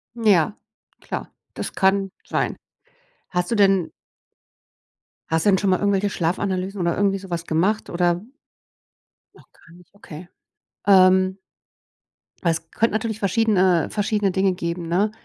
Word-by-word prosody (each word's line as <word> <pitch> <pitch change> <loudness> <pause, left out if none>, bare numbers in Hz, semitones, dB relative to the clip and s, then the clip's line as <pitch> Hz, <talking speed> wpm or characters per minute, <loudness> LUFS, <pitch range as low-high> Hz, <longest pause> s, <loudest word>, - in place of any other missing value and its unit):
Ja, 210 -5 +2 0.4
klar. - - -6 0.2
Das - - -5
kann 195 0 +2 0.2
sein. - - -1 0.7
Hast 180 0 -1
du - - +1
denn 195 -4 +3 1.4
Hast 160 0 0
du 205 - +5
denn 190 - +3
schon 200 0 +1
mal 185 - +3
irgendwelche 200 0 +1
Schlafanalysen 190 +2 -2
oder 170 -1 0
irgendwie 195 0 +1
so 190 0 -11
was 170 -1 -3
gemacht, 190 +7 0
oder 175 0 0 1.1
Noch - - -21
gar 170 - -21
nicht, 180 +2 -19
okay. 175 -3 -11 0.6
Ähm 185 -1 +5 1.0
Weil 170 - +2
es 165 0 -6
könnte 230 -1 0
natürlich 220 0 -2
verschiedene 190 -4 +2
verschiedene 210 -1 0
Dinge 190 +1 +1
geben, 170 -1 -4
ne, 195 +5 +1
190 Hz, 140 wpm, -22 LUFS, 175-200 Hz, 1.4 s, du